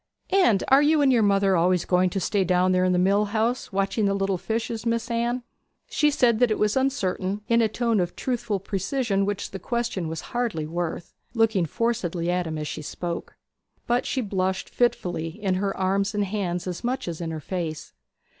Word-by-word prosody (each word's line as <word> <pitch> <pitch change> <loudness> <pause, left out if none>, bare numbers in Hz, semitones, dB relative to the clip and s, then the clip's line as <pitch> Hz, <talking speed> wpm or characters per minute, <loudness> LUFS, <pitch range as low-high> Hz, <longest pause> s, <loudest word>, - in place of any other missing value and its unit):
'And 240 - +4
are 270 +1 +7
you 300 0 +4
and 265 -2 +4
your 235 - +4
mother 195 -2 +3
always 180 +1 +2
going 180 0 +3
to 195 - -2
stay 195 +2 +1
down 180 0 +2
there 185 0 +3
in 185 - +3
the 180 - +2
mill 200 +3 +3
house 225 +4 -1
watching 195 +2 0
the 200 0 +2
little 195 -2 0
fishes, 225 +3 -3
Miss 230 0 -1
Anne?' 235 +1 0 0.5
She 300 - +3
said 245 -6 +3
that 245 -1 +4
it 215 - 0
was 210 0 +1
uncertain, 205 -7 0
in 230 0 +4
a 225 - +4
tone 230 0 0
of 175 -1 -1
truthful 235 -5 -2
precision 200 +1 -1
which 205 -1 -3
the 195 - -6
question 235 -5 -2
was 160 0 -4
hardly 235 -11 -1
worth, 170 +1 -4 0.2
looking 220 -7 +2
forcedly 175 -5 -1
at 180 -1 0
him 160 -1 -4
as 150 0 -4
she - - -5
spoke. 170 +3 -5 0.5
But 240 +1 +1
she 260 - 0
blushed 190 -3 -2
fitfully, 175 -9 0
in 195 -3 0
her 200 -1 -1
arms 195 +2 0
and 205 -1 +1
hands 185 -3 -2
as 180 +2 -5
much 255 0 -2
as 170 -1 -4
in 165 - -3
her 160 -1 -4
face. 160 -1 -5
200 Hz, 200 wpm, -25 LUFS, 180-230 Hz, 0.5 s, are